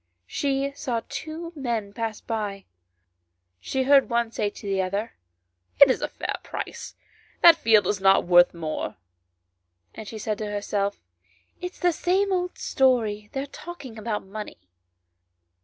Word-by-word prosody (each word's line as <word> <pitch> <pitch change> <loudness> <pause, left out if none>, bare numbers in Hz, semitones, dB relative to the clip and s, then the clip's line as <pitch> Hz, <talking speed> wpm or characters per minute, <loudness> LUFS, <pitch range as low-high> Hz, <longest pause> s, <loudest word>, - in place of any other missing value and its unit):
She 275 - -1
saw 255 -5 -3
two 330 +2 -6
men 230 -7 -3
pass 225 -1 -4
by; 205 -4 -4 0.9
she 265 - -1
heard 275 0 +5
one 235 -1 +1
say 210 -2 -1
to 205 - -12
the 195 -1 +1
other 200 +5 -2 0.3
" 90 0 -42
It 280 -2 +9
is - - -1
a - - 0
fair - - -4
price; - - -6 0.5
that 340 -1 +10
field 220 - +4
is 195 +1 -1
not 195 0 +5
worth 175 0 +6
more;" 160 -2 -4 1.0
and 220 - -9
she 220 - -7
said 215 0 -3
to 215 - -3
herself 205 -1 -2 0.3
" - - -37
It 360 0 -5
is 350 -2 +2
the 380 +3 +2
old 360 -1 -1
story, 220 -6 +1
they 270 - -2
are - - -5
talking 280 -6 -9
of 215 -1 -3
money." 210 +2 -7
225 Hz, 155 wpm, -25 LUFS, 200-275 Hz, 1.0 s, that